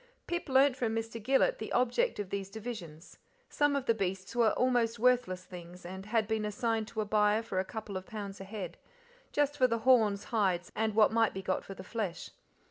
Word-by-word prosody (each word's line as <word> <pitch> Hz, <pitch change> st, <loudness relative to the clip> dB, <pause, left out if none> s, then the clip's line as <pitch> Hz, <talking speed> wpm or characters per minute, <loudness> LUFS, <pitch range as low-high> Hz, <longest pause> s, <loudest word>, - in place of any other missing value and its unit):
Pip 345 Hz, -3 st, -3 dB
learnt 265 Hz, 0 st, +5 dB
from 230 Hz, -4 st, -1 dB
Mr. 225 Hz, 0 st, -4 dB
Gillet 265 Hz, +5 st, +2 dB
the 220 Hz, -, -5 dB
object 255 Hz, -, +2 dB
of 200 Hz, -2 st, -5 dB
these 195 Hz, -1 st, -3 dB
divisions: 200 Hz, -7 st, -8 dB, 0.3 s
some 290 Hz, -1 st, +2 dB
of 275 Hz, -2 st, -1 dB
the 230 Hz, -, +4 dB
beasts 190 Hz, -2 st, -3 dB
were 235 Hz, -2 st, +5 dB
almost 240 Hz, -2 st, +2 dB
worthless 240 Hz, -6 st, +2 dB
things, 180 Hz, -1 st, -11 dB
and 190 Hz, +3 st, -7 dB
had 220 Hz, -1 st, +1 dB
been 220 Hz, -1 st, 0 dB
assigned 220 Hz, +1 st, -1 dB
to 220 Hz, 0 st, -3 dB
a -, -, -2 dB
buyer 210 Hz, +1 st, +3 dB
for 190 Hz, -4 st, -2 dB
a -, -, +1 dB
couple 215 Hz, -2 st, -6 dB
of 185 Hz, 0 st, -5 dB
pounds 200 Hz, -2 st, -6 dB
a -, -, -5 dB
head, 195 Hz, -1 st, -7 dB, 0.5 s
just 290 Hz, 0 st, +1 dB
for 260 Hz, -3 st, +4 dB
the 230 Hz, -, 0 dB
horns, 220 Hz, -6 st, +4 dB
hides, 190 Hz, -6 st, 0 dB
and 220 Hz, -1 st, 0 dB
what 215 Hz, -1 st, +5 dB
might 225 Hz, -2 st, +2 dB
be 190 Hz, -, -4 dB
got 185 Hz, 0 st, -1 dB
for 195 Hz, -, -9 dB
the 190 Hz, -, -9 dB
flesh. 200 Hz, -4 st, -4 dB
220 Hz, 210 wpm, -31 LUFS, 195-240 Hz, 0.5 s, learnt